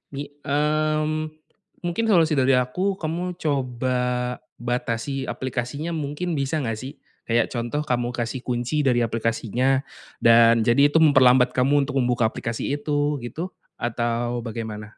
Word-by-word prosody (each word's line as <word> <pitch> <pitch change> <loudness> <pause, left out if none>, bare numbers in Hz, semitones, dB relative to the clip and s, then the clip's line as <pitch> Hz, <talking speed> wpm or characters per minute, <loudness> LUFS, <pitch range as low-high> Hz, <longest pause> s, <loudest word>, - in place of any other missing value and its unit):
Mi 140 +1 -5 0.2
mmm, 155 +1 0 0.5
mungkin 175 +6 -1
solusi 165 -7 +4
dari 130 0 +4
aku 130 +11 0
kamu 175 +3 -3
coba 130 -4 -1 0.6
batasi 125 +2 -2
aplikasinya 130 +6 -3
mungkin 155 +3 -3
bisa 140 +3 -1
nggak 115 -4 -2
sih? 130 +4 -7 0.3
Kayak 115 +1 +1
contoh 120 +5 -2
kamu 120 -4 -1
kasih 120 +2 -3
kunci 125 +4 -1
dari 120 -2 +3
aplikasinya, 115 +3 0 0.4
dan 115 0 +6
jadi 120 +6 +5
itu 160 - +5
memperlambat 130 -4 +6
kamu 135 +3 +2
untuk 140 -1 -2
membuka 125 -1 +1
aplikasi 115 +3 -4
itu 145 0 0
gitu, 160 +10 -5 0.3
atau 120 +1 -1
bagaimana? 110 -2 -5
130 Hz, 130 wpm, -23 LUFS, 120-150 Hz, 0.6 s, dan